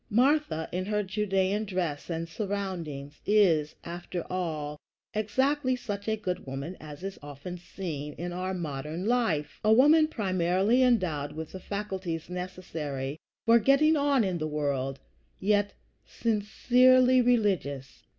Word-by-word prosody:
Martha, 250 - +2
in 185 +1 -2
her 210 +1 0
Judæan 195 +1 0
dress 175 -7 -2
and 165 0 -2
surroundings, 170 -7 -4
is, 170 -8 +3
after 175 0 -5
all, 155 -5 -3 0.3
exactly 255 +5 +1
such 205 -4 -5
a 220 - +2
good 185 -8 -4
woman 140 +7 -5
as 150 +2 -10
is 195 0 -5
often 145 +5 -7
seen 155 -5 -6
in 175 +1 -5
our 185 +1 -2
modern 155 +1 -4
life, 215 -11 0
a 215 - +4
woman 300 +7 +6
primarily 190 - +1
endowed 175 - +2
with 160 0 -6
the 190 - -7
faculties 190 -5 -4
necessary 160 -6 -5 0.3
for 230 0 +6
getting 275 +7 +4
on 280 -4 +3
in 185 -3 -1
the 155 - -1
world, 140 -3 -2 0.4
yet 205 0 +2 0.3
sincerely 250 +4 +4
religious. 195 - 0
185 Hz, 130 wpm, -28 LUFS, 155-215 Hz, 0.4 s, woman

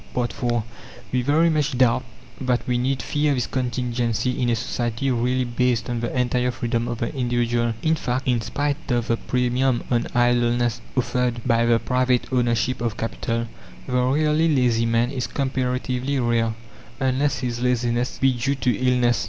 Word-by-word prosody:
IV 120 -1 0 0.8
We 125 - +1
very 155 +6 +3
much 150 -3 0
doubt 125 0 +3 0.4
that 125 -2 -1
we 125 -1 +1
need 130 +2 -1
fear 145 -1 +1
this 125 -2 0
contingency 125 -1 -1
in 120 - +2
a 120 - +2
society 120 +2 -2
really 125 +1 +1
based 125 0 0
on 120 - -1
the 120 - -2
entire 125 0 +1
freedom 120 -1 -2
of 120 - -3
the 115 - -3
individual. 120 -2 0
In 160 - +3
fact, 130 -4 -2
in 120 -2 +2
spite 145 +4 -2
of 120 -2 0
the 115 - +2
premium 125 +1 0
on 120 -1 +1
idleness 120 -1 +2 0.2
offered 125 -1 0
by 115 -2 +3
the 115 -1 +5
private 125 +1 0
ownership 120 0 +1
of 115 -3 -2
capital, 115 +1 -2 0.4
the - - -5
really 150 +6 +2
lazy 120 -5 +2
man 115 +2 +1
is 130 -3 -2
comparatively 130 0 -1
rare, 115 -2 +1 0.4
unless 135 +2 +1
his 120 -2 -3
laziness 125 0 0
be 135 -1 +3
due 130 +3 -1
to 125 -3 0
illness. 125 0 +2
125 Hz, 165 wpm, -23 LUFS, 120-130 Hz, 0.8 s, the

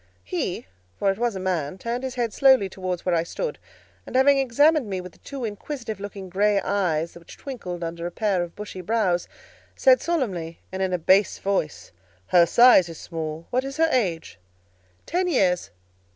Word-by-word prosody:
He, 90 - -3 0.3
for 195 - +2
it 195 - -6
was 240 -3 0
a - - -4
man, 180 -4 -2
turned 235 +5 -4
his 260 -1 -4
head 235 -3 -1
slowly 265 -7 +5
towards 185 -2 -4
where 180 - +1
I 165 - +3
stood, 465 - -4 0.4
and - - -10
having 275 +1 +5
examined 285 +2 +3
me 190 -1 -2
with 180 0 -8
the - - -24
two 275 -4 -6
inquisitive 220 0 -5
looking 200 -1 -7
grey 200 +2 +2
eyes 175 -5 -1
which 170 -1 -13
twinkled 180 -11 -6
under 170 +1 -4
a - - -6
pair 200 -2 0
of 175 -1 -6
bushy 210 -3 -7
brows, 180 -3 0 0.5
said - - +5
solemnly, 190 - -2
and 190 0 -4
in 190 -1 0
a 180 - +1
bass 190 +4 +3
voice, 155 - -2 0.3
"Her 170 - +5
size 235 -4 +6
is 165 - -8
small: 160 -1 -6
what 255 +1 +1
is 275 +1 -6
her 325 0 +3
age?" 170 - -1 0.7
"Ten 360 +2 0
years." 190 - +1
195 Hz, 185 wpm, -24 LUFS, 175-250 Hz, 0.7 s, size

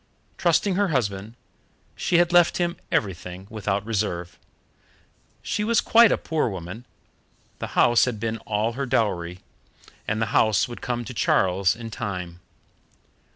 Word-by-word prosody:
Trusting 180 +3 +2
her 205 0 +2
husband, 110 - -2 0.6
she 175 - +1
had 175 0 +3
left 175 -1 +5
him 175 -1 0 0.2
everything 90 -1 -2
without 100 -2 -2
reserve. 90 -7 -3 1.0
She 210 - -1
was 225 +1 +3
quite 230 -1 +6
a - - +2
poor 155 -6 -1
woman 95 +5 -8 0.7
the - - -4
house 120 -1 +5
had 120 -4 -3
been 115 0 -3
all 110 +1 -1
her 135 +2 -3
dowry, 90 -8 -1 0.7
and 110 +1 -1
the 110 - +1
house 105 -6 +3
would 120 - -9
come 120 -1 -3
to 130 - -7
Charles 95 -2 +2
in 115 -1 -8
time. 90 -5 -5
110 Hz, 145 wpm, -24 LUFS, 95-130 Hz, 1.0 s, quite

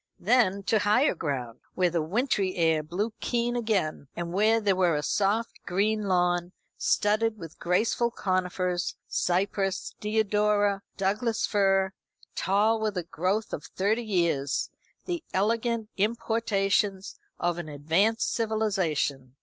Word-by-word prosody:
Then 200 -2 +2
to 215 +2 +2
higher 215 +8 +3
ground, 130 -8 -4 0.2
where 180 -2 +2
the 170 -1 0
wintry 195 - 0
air 160 -2 +2
blew 185 +9 -3
keen 240 0 -1
again, 205 - -1
and 170 0 -4
where 215 +4 +3
there 205 -3 +2
was 175 -5 +2
a 150 - -3
soft 210 +3 0
green 205 +3 0
lawn, 175 -1 +1 0.2
studded 215 +2 +1
with 165 -5 -10
graceful 220 +7 +1
conifers 185 -4 -1
cypress, 195 +1 -1
deodora, 210 -1 +1 0.2
Douglas 215 +3 0
fir 195 -2 +2 0.4
tall 210 +4 +2
with 215 -3 -1
a 180 - -1
growth 185 +6 -2
of 150 - -4
thirty 210 +5 0
years; 170 -9 0 0.3
the 345 -2 -3
elegant 225 +3 0
importations 200 -2 0 0.2
of 175 0 0
an 165 -3 -6
advanced 165 +10 +1
civilisation. 190 - -1
195 Hz, 125 wpm, -27 LUFS, 175-220 Hz, 0.4 s, higher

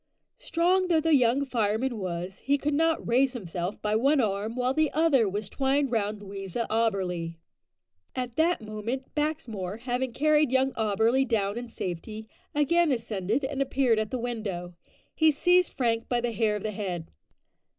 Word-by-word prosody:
Strong 365 +2 +2
though 335 -3 +3
the 325 0 +2
young 260 +1 +3
fireman 230 0 0
was, 180 0 -4
he 285 +1 +1
could 290 +1 -1
not 325 +2 +1
raise 255 +2 +3
himself 180 -4 -4
by 210 0 +1
one 275 +6 +3
arm, 215 0 -1
while 255 +1 +1
the 310 +1 +2
other 280 -9 +3
was 205 +1 -3
twined 270 +3 0
round 210 -2 -1
Louisa 195 +3 -4
Auberly. 185 -7 0 0.8
At 250 -2 -3
that 330 -1 +2
moment, 220 +5 -5
Baxmore, 230 - -3
having 250 +1 -2
carried 300 +2 +3
young 265 +1 +2
Auberly 225 +4 +2
down 205 -5 0
in 240 0 -5
safety, 215 +3 -6 0.3
again 330 +2 +3
ascended 225 0 -1
and 275 +1 -2
appeared 260 -4 +2
at 215 -1 -2
the 255 - -2
window. 215 -8 -4 0.4
He 315 -1 +4
seized 355 +4 +3
Frank 230 -3 0
by 245 - +1
the 240 0 -1
hair 215 -1 +1
of 210 - -5
the 215 - -2
head. 185 -5 -5
235 Hz, 165 wpm, -27 LUFS, 210-275 Hz, 0.8 s, He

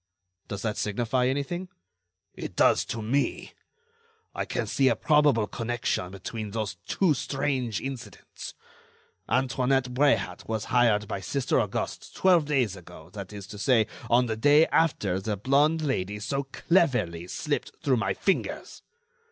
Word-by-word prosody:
"Does 100 -1 -5
that 110 -2 -1
signify 120 +4 0
anything?" 145 +7 -2 0.6
"It - - -7
does - - +4
to 115 -1 -4
me. 135 +6 -1 0.8
I - - -2
can - - -2
see 135 - +2
a 120 - +4
probable 145 -4 +3
connection 115 -5 -2
between 105 +3 -6
those 105 -3 -3
two 185 -6 +2
strange 130 -5 -1
incidents. 125 -5 -8 0.7
Antoinette 130 0 +1
Bréhat 115 -9 +1
was 110 -1 -2
hired 110 -4 +3
by 100 - -3
Sister 135 +7 0
Auguste 105 -3 -4
twelve 180 -5 +4
days 130 -9 +1
ago, 85 -2 -13
that 100 -2 -7
is 100 -2 -8
to 105 0 -10
say, 115 -2 +4 0.2
on 120 +1 +4
the 110 -2 -2
day 145 +7 +5
after 105 - +2
the 105 +1 -3
blonde 145 +8 +2
Lady 105 -8 -1
so 140 +6 -2
cleverly 125 - +1
slipped - - -2
through 130 -3 +3
my 95 -4 0
fingers. 195 - -2
120 Hz, 145 wpm, -27 LUFS, 105-140 Hz, 0.8 s, day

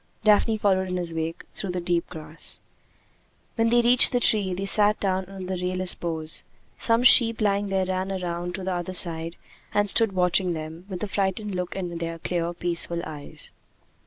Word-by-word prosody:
Daphne 215 +1 +3
followed 190 -3 +1
in 180 - -2
his 175 -2 -2
wake, 165 0 -4
through 195 - -3
the 180 0 -2
deep 175 -1 -1
grass. 155 -1 -6 0.9
When 230 0 +1
they 240 +1 +4
reached 245 +1 +6
the 245 - +1
tree, 205 -5 +1
they 195 +2 -4
sat 210 +1 +5
down 190 -1 -1
under 190 0 -6
the 180 - -6
rayless 185 0 +1
boughs. 160 -2 -4 0.4
Some 230 +1 +2
sheep 230 -2 +8
lying 205 -1 0
there 190 -1 0
ran 185 +1 -3
round 175 +1 -4
to 190 - -6
the 190 0 -2
other 175 +1 -4
side 165 -2 +1 0.4
and 205 0 +1
stood 220 0 +3
watching 180 0 +1
them, 160 +3 -8
with 185 -1 -6
a - - -2
frightened 195 +1 -2
look 180 -1 -4
in 175 -3 -5
their 165 0 -4
clear, 170 0 -2
peaceful 170 0 -3
eyes. 150 -2 -7
185 Hz, 190 wpm, -24 LUFS, 170-200 Hz, 0.9 s, sheep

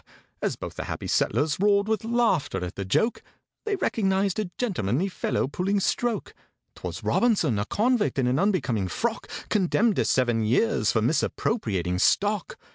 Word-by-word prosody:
As - - -1
both - - -7
the - - -5
happy - - -5
settlers 150 +2 +1
roared 200 +1 +3
with 220 -2 0
laughter 230 - +1
at 90 - -7
the 100 - -4
joke, 220 - +1 0.4
They 425 -2 0
recognized 195 - 0
a 210 -4 -2
gentlemanly 180 - -1
fellow 180 - -1
pulling 190 +8 0
stroke: 235 +4 -1 0.4
'Twas - - -7
ROBINSON—a 160 - +2
convict, 230 - +1
in 130 - +2
an 125 +3 +1
unbecoming 160 - +1
frock! 230 - -2 0.2
Condemned 210 +2 +2
to - - +2
seven 120 -3 +2
years 175 - +2
for 110 - +1
misappropriating 110 - 0
stock!!! 205 - +1
190 Hz, 150 wpm, -26 LUFS, -, 0.4 s, roared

